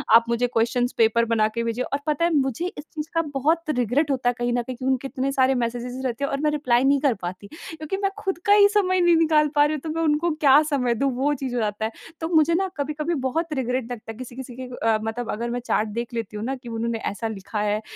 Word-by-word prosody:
आप 230 Hz, 0 st, +7 dB
मुझे 235 Hz, +1 st, +1 dB
questions 245 Hz, +1 st, +1 dB
paper 230 Hz, 0 st, +4 dB
बना 225 Hz, -2 st, +2 dB
के 235 Hz, -, 0 dB
भेजिए। 230 Hz, +2 st, -1 dB
और 280 Hz, -, -2 dB
पता 305 Hz, +2 st, +2 dB
है 340 Hz, -, +1 dB
मुझे 270 Hz, +3 st, 0 dB
इस 295 Hz, -5 st, -8 dB
चीज़ 305 Hz, 0 st, -4 dB
का 330 Hz, -, +2 dB
बहुत 315 Hz, +4 st, +1 dB
रिग्रेट 255 Hz, +5 st, +1 dB
होता 255 Hz, -2 st, +1 dB
है -, -, 0 dB
कहीं 240 Hz, 0 st, -1 dB
न 245 Hz, -, +1 dB
कहीं 255 Hz, 0 st, -5 dB
उनके 265 Hz, 0 st, 0 dB
इतने 270 Hz, +1 st, -2 dB
सारे 265 Hz, -1 st, +3 dB
मैसेजेज़ 245 Hz, +1 st, -3 dB
रहते 250 Hz, +3 st, -4 dB
हैं 280 Hz, -, -1 dB
और 275 Hz, -, -1 dB
मैं 300 Hz, -, +3 dB
रिप्लाई 255 Hz, -5 st, +2 dB
नहीं 280 Hz, +1 st, +4 dB
कर 280 Hz, -4 st, +3 dB
पाती 185 Hz, +3 st, -6 dB
क्योंकि 320 Hz, +2 st, -6 dB
मैं 390 Hz, 0 st, 0 dB
खुद 385 Hz, -4 st, -2 dB
का 405 Hz, -, +6 dB
ही 410 Hz, -1 st, +7 dB
समय 370 Hz, -3 st, +2 dB
नहीं 345 Hz, -1 st, +5 dB
निकाल 310 Hz, -2 st, +4 dB
पा 290 Hz, 0 st, +6 dB
रही 295 Hz, -, 0 dB
हूँ 300 Hz, -, -4 dB
तो 320 Hz, -, -5 dB
मैं 325 Hz, +1 st, -2 dB
उनको 310 Hz, +2 st, +2 dB
क्या 285 Hz, 0 st, +7 dB
समय 250 Hz, -4 st, +1 dB
दूँ 275 Hz, +4 st, +1 dB
वो 280 Hz, +4 st, +1 dB
चीज़ 260 Hz, -3 st, -4 dB
हो 240 Hz, -, 0 dB
जाता 210 Hz, 0 st, -1 dB
है। 220 Hz, -, -3 dB, 0.3 s
तो 320 Hz, -, -1 dB
मुझे 315 Hz, +1 st, +5 dB
न 385 Hz, -1 st, -1 dB
कभी-कभी 300 Hz, +3 st, -2 dB
बहुत 325 Hz, +4 st, -2 dB
रिग्रेट 250 Hz, -2 st, -2 dB
लगता 225 Hz, -2 st, -6 dB
है 220 Hz, -, -11 dB
किसी-किसी 255 Hz, 0 st, -8 dB
के 260 Hz, -, -7 dB, 0.2 s
अ, 220 Hz, -1 st, +4 dB
मतलब 225 Hz, +2 st, -3 dB
अगर 235 Hz, +3 st, -3 dB
मैं 245 Hz, +1 st, -2 dB
चैट 225 Hz, -3 st, 0 dB
देख 235 Hz, +3 st, -5 dB
लेती 225 Hz, -2 st, -4 dB
हूँ 210 Hz, -, -4 dB
न 265 Hz, +2 st, -2 dB
कि 240 Hz, -, -8 dB
उन्होंने 230 Hz, 0 st, -2 dB
ऐसा 205 Hz, +3 st, -4 dB
लिखा 210 Hz, 0 st, -5 dB
है 210 Hz, 0 st, 0 dB
260 Hz, 265 wpm, -24 LUFS, 235-300 Hz, 0.3 s, आप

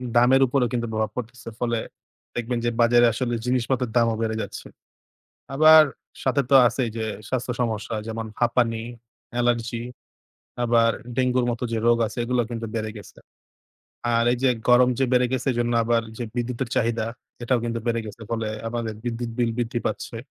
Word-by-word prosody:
দামের 125 Hz, +3 st, +5 dB
উপরেও 125 Hz, -1 st, +1 dB
কিন্তু 120 Hz, -1 st, -1 dB
প্রভাব 110 Hz, -1 st, -1 dB
পড়তেছে। 120 Hz, -1 st, -6 dB
ফলে 120 Hz, -1 st, 0 dB, 0.6 s
দেখবেন 120 Hz, 0 st, -2 dB
যে, -, -, +3 dB
বাজারে 120 Hz, +1 st, +5 dB
আসলে 125 Hz, 0 st, -2 dB
জিনিসপত্রের 125 Hz, -1 st, 0 dB
দামও 115 Hz, -1 st, +3 dB
বেড়ে 110 Hz, -1 st, -1 dB
যাচ্ছে। -, -, -7 dB, 0.9 s
আবার 155 Hz, +2 st, +8 dB, 0.4 s
সাথে 135 Hz, +1 st, +2 dB
তো -, -, +2 dB
আছেই 120 Hz, +1 st, -1 dB
যে, 110 Hz, -, -2 dB, 0.3 s
স্বাস্থ্য 125 Hz, -1 st, -1 dB
সমস্যা 110 Hz, -1 st, -2 dB
যেমন 115 Hz, 0 st, -4 dB
হাঁপানি, 120 Hz, -1 st, +2 dB, 0.6 s
allergy 120 Hz, -1 st, 0 dB, 0.8 s
আবার 115 Hz, -1 st, +4 dB, 0.3 s
ডেঙ্গুর 125 Hz, -1 st, +2 dB
মতো 120 Hz, +1 st, -3 dB
যে, -, -, 0 dB
রোগ 120 Hz, 0 st, +5 dB
আছে -, -, -8 dB
এগুলা 125 Hz, 0 st, +1 dB
কিন্তু 115 Hz, -1 st, -4 dB
বেড়ে 110 Hz, -1 st, -2 dB
গেছে। 105 Hz, -, -12 dB, 1.0 s
আর 115 Hz, 0 st, +3 dB
এই -, -, 0 dB
যে, 135 Hz, -, +4 dB, 0.2 s
গরম 125 Hz, +1 st, +6 dB
যে, 135 Hz, -, +3 dB
বেড়ে 125 Hz, 0 st, +4 dB
গেছে 130 Hz, -2 st, -2 dB
এজন্য 120 Hz, 0 st, 0 dB
আবার 115 Hz, 0 st, +2 dB, 0.2 s
যে, -, -, -3 dB
বিদ্যুতের 120 Hz, +1 st, -2 dB
চাহিদা 115 Hz, 0 st, +1 dB, 0.4 s
এটাও 125 Hz, +1 st, +2 dB
কিন্তু 115 Hz, 0 st, -2 dB
বেড়ে 115 Hz, -1 st, +1 dB
গেছে। 105 Hz, +2 st, -9 dB
ফলে 115 Hz, -1 st, -1 dB, 0.2 s
আমাদের 115 Hz, -1 st, -3 dB
বিদ্যুৎ 120 Hz, 0 st, -3 dB
বিল 120 Hz, -1 st, +2 dB
বৃদ্ধি 120 Hz, 0 st, -1 dB
পাচ্ছে। 115 Hz, -, -4 dB
120 Hz, 165 wpm, -24 LUFS, 115-125 Hz, 1.0 s, আবার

